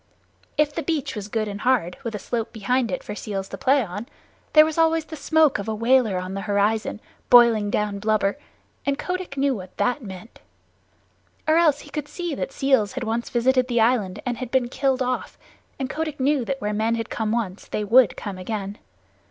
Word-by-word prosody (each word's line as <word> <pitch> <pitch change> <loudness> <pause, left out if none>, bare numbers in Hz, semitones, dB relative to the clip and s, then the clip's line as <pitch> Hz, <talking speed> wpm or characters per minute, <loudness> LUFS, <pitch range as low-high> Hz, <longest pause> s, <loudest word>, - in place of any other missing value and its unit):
If 295 -1 +2
the 330 - -2
beach 315 -7 -2
was 205 -2 -5
good 215 0 -1
and 205 0 -6
hard, 225 -9 +1
with 230 -2 -4
a - - -1
slope 225 +3 -3
behind 235 +3 0
it 180 - -3
for - - -6
seals 200 -2 -4
to 195 - -6
play 265 +1 +3
on, 205 +5 -7 0.5
there 305 0 +8
was 315 +1 -2
always 325 -1 +3
the 320 - -8
smoke 310 -3 +3
of 200 - -5
a 220 - -1
whaler 230 -3 +3
on 185 +1 -4
the 195 - -3
horizon, 210 +2 +1 0.3
boiling 235 -4 +6
down 205 -1 -1
blubber, 210 -1 +1 0.5
and 280 0 0
Kotick 365 -5 -4
knew 275 0 +2
what 185 -3 -10
that 250 +4 +1
meant. 200 0 -10 1.1
Or 315 +1 +4
else 310 -4 +4
he - - -14
could 300 -1 -4
see 345 +2 -4
that 270 - -3
seals 265 -7 +2
had 260 -1 -4
once 230 +1 -2
visited 255 +1 +2
the 240 -2 +1
island 210 -4 +1
and 245 0 -3
been 250 -1 +1
killed 265 0 0
off, 255 0 -3 0.4
and 265 - -2
Kotick 305 +1 -4
knew 270 -1 +2
that 275 +2 -3
where 210 -4 -2
men 220 +2 +1
had 230 0 -4
come 220 -2 -1
once 215 -5 -3
they 210 - -2
would 235 +3 +5
come 195 -2 -6
again. 200 +1 -4
235 Hz, 205 wpm, -23 LUFS, 210-275 Hz, 1.1 s, there